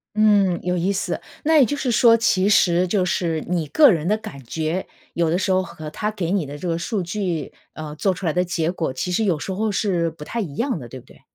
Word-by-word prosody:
嗯， 205 -4 +3
有 180 0 0
意 180 +3 0
思。 195 - -2 0.2
那 320 +1 +4
也 280 - +7
就 290 +4 -2
是 255 -3 -1
说 230 0 +6
其 200 -3 +2
实 180 -3 +4
就 185 0 +1
是 165 -3 -1
你 170 -2 -1
个 285 - +6
人 165 -3 -1
的 210 +3 +2
感 215 -11 -10
觉， 160 +8 -3 0.3
有 170 -1 +1
的 170 - +1
时 190 +1 0
候 185 0 +3
和 170 -4 -8
它 210 +6 -2
给 190 -6 -3
你 190 -5 +1
的 145 +1 -7
这 180 - -5
个 165 -1 0
数 205 +1 -2
据， 175 -4 -3 0.2
呃， 150 -1 -7
做 190 +5 +1
出 185 +1 -7
来 160 - +1
的 180 - +2
结 170 -2 -1
果， 165 -6 -2
其 130 +8 -3
实 200 +5 +1
有 185 -7 +1
时 190 +6 -4
候 215 +3 -1
是 180 -4 0
不 160 -1 -11
太 235 - -4
一 155 -9 -6
样 245 - -1
的， 120 - -10
对 130 - -9
不 - - -19
对？ - - -19
180 Hz, 280 characters per minute, -22 LUFS, 165-210 Hz, 0.3 s, 也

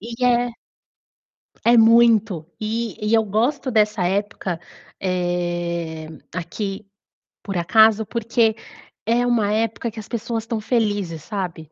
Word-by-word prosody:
e 235 +4 -4
é 245 0 +3 1.1
é 235 +1 +6
muito. 225 -6 +5
E 225 +1 -2
e 215 - +2
eu 225 -1 +4
gosto 240 +7 0
dessa 210 -4 +2
época, 190 -2 -2 0.4
eh, 175 -3 -2 0.3
aqui, 195 +4 -4 0.6
por 195 -3 -3
acaso, 220 +5 +4
porque 230 0 +1 0.5
é 235 +2 +2
uma 225 -4 +2
época 225 +1 -1
que 220 - -9
as 210 - -9
pessoas 230 -1 -3
estão 225 0 -3
felizes, 205 - -1
sabe. 175 -6 -5
215 Hz, 125 wpm, -22 LUFS, 180-230 Hz, 1.1 s, é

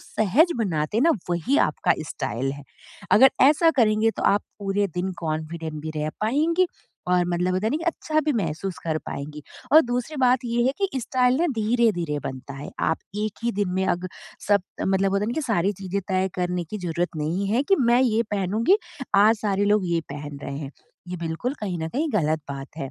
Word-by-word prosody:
सहज 255 - +2
बनाते 175 -4 -1
हैं 240 - +3
ना 335 - +5 0.2
वही 195 - +1
आपका - - +2 0.2
स्टाइल 135 +3 -3
है। 145 0 -10 0.5
अगर 265 +5 +8
ऐसा 310 +4 +6
करेंगे 220 0 +4
तो - - -6
आप 205 +1 +3 0.2
पूरे 200 0 0
दिन 185 +1 -1
कॉन्फिडेंट 160 0 -4
भी 155 - -4
रह 150 0 -1
पाएँगी 315 +11 +2 0.4
और 180 -1 +3
मतलब 180 +1 0
होता 195 +4 0
है - - +1
ना 300 - +1
कि 330 - -5
अच्छा 310 -2 0
भी 300 -1 0
महसूस 190 -4 -3
कर 155 -1 0
पाएँगी। 150 +1 -6 0.3
और 315 - +10
दूसरी 250 +5 -3
बात 255 0 +4
ये 235 0 0
है 265 - +2
कि 385 -10 -1
स्टाइल 250 +1 +2
ना 345 - +3
धीरे-धीरे 210 -9 +1
बनता 130 +1 -6
है 140 +2 -7
आप 160 - +1 0.3
एक 215 - -5
ही 235 - +1
दिन 200 -1 -1
में 190 0 +1
अग 175 +1 0 0.4
सब 200 -2 +4 0.2
मतलब 195 0 +1
होता 200 +1 +1
है - - -3
ना - - -1
कि 315 - -1
सारी 205 -6 +1
चीज़ें 195 +1 -2
तय 190 0 +1
करने 180 -1 -1
की 210 - -4
ज़रूरत 175 0 -1
नहीं 165 +6 -1
है 240 +6 +2
कि 390 +6 +3
मैं 240 0 +4
ये 230 -2 +2
पहनूँगी, 215 - +2 0.4
आज 215 +3 +6
सारे 205 -1 +1
लोग 205 -2 +2
ये 170 - +2
पहन 145 0 -7
रहे 140 0 -5
हैं, 140 -2 -6 0.4
ये 180 - -4
बिल्कुल 170 - -3
कहीं 185 -5 -3
न 160 - -3
कहीं 300 - -1
ग़लत 155 -4 +1
बात 135 0 -6
है। 135 -2 -4
195 Hz, 210 wpm, -24 LUFS, 165-240 Hz, 0.5 s, और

